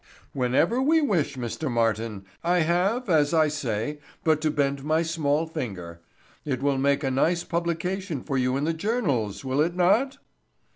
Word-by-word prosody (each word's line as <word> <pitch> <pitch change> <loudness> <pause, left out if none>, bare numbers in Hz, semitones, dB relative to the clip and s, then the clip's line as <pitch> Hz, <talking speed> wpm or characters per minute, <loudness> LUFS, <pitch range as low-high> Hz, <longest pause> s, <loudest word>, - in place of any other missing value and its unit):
"Whenever 135 - +2
we 315 +4 +4
wish, 175 - 0
Mr. 125 +5 -3
Martin. 115 -3 -1 0.2
I 175 +1 +2
have, 185 +9 +1
as 155 -3 +3
I 155 -1 +4
say, 140 -1 -3 0.2
but 155 -1 +2
to 155 - +1
bend 140 -2 0
my 155 +2 +1
small 160 -2 0
finger. 95 - -6 0.4
It 135 -3 -3
will 140 -1 +1
make 140 +2 +2
a 135 - 0
nice 170 +6 +1
publication 170 -1 -2
for 140 - -3
you 130 0 +1
in 140 - -2
the 165 +2 +1
journals, 160 - -1
will 135 +2 +1
it 170 +3 0
not?" 220 +10 +2
150 Hz, 165 wpm, -25 LUFS, 130-170 Hz, 0.4 s, we